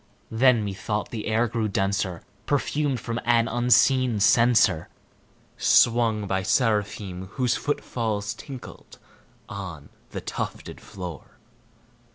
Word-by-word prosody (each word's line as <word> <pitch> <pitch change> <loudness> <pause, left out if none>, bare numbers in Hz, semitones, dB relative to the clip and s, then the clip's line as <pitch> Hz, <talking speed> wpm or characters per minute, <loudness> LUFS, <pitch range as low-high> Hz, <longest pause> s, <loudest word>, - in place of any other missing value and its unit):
Then, 115 -1 +4
methought, 100 +2 -3
the 110 -3 -5
air 110 +2 +2
grew 115 -1 -1
denser, 95 -2 -1 0.2
perfumed 145 -2 0
from 115 +1 -4
an 115 -1 +3
unseen 120 0 +3
censer 110 -5 +4 0.7
Swung 115 -3 +3
by 95 -1 -1
seraphim 100 -4 0
whose 125 -1 +1
foot 145 - -2
falls 105 -4 -2
tinkled 135 -4 -11 0.5
on 90 -8 -8 0.2
the - - -5
tufted - - -6
floor. 90 -5 -9
110 Hz, 110 wpm, -25 LUFS, 100-120 Hz, 0.7 s, Then